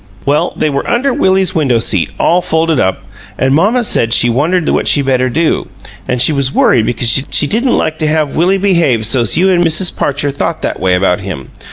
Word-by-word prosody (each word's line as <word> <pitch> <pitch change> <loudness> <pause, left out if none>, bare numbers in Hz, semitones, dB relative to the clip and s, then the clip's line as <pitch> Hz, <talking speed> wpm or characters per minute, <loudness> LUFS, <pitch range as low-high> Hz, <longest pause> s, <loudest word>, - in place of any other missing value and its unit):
"Well, 145 +2 0
they 155 - 0
were 140 - -3
under 260 +3 0
Willie's 190 -4 +1
window 135 -7 +1
seat, 100 -6 0
all 175 +2 +2
folded 160 -3 0
up; 95 -4 -1 0.3
an' 130 +1 0
mamma 210 - +2
said 115 - +1
she 120 - +3
wondered 160 +7 0
what - - 0
she 145 - +3
better 130 -1 0
do, 160 +6 -1 0.4
an' 125 - -1
she 125 +5 +2
was 140 -2 -1
worried 115 -5 +2
because 120 +2 +1
she - - +1
didn't 240 - 0
like 155 - -2
to 155 - -1
have 155 -2 -1
Willie 180 +4 +2
behave 170 - +1
so's 115 0 -1
you 190 +2 +3
an' 175 -1 +2
Mrs. 170 +2 0
Parcher 145 0 -1
thought 155 +4 -4
that - - -3
way 90 0 +1
about 90 0 0
him. 90 -10 -8
145 Hz, 210 wpm, -12 LUFS, 120-175 Hz, 0.4 s, she